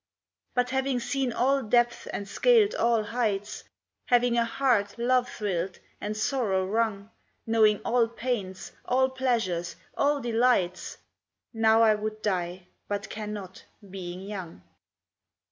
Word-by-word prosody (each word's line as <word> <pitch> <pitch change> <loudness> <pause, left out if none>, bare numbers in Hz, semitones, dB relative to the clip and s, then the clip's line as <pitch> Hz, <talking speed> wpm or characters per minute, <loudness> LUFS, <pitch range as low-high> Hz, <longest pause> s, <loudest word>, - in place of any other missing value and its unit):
But 250 0 +1
having 265 -1 0
seen 265 +1 -1
all 270 +4 +2
depths 240 +1 +1
and 200 - -5
scaled 450 - +4
all 235 - +2
heights, 210 -3 -2 0.4
Having 245 -1 +3
a 230 - +2
heart 230 -4 +1
love 250 +1 +2
thrilled, 190 -3 -3 0.2
and 210 +1 -3
sorrow 215 -5 0
wrung, 215 0 -1 0.3
Knowing 220 -2 +4
all 235 -1 +3
pains, 230 -6 -4
all 260 +1 +2
pleasures, 230 -10 -1 0.2
all 285 0 +2
delights, 230 -7 +1 0.6
Now 225 0 +4
I 220 -1 +6
would 215 0 -4
die 180 -2 -2 0.2
but 205 0 -4
cannot, 210 -3 -7 0.3
being 180 -1 -6
young. 190 - -7
225 Hz, 125 wpm, -27 LUFS, 200-245 Hz, 0.6 s, I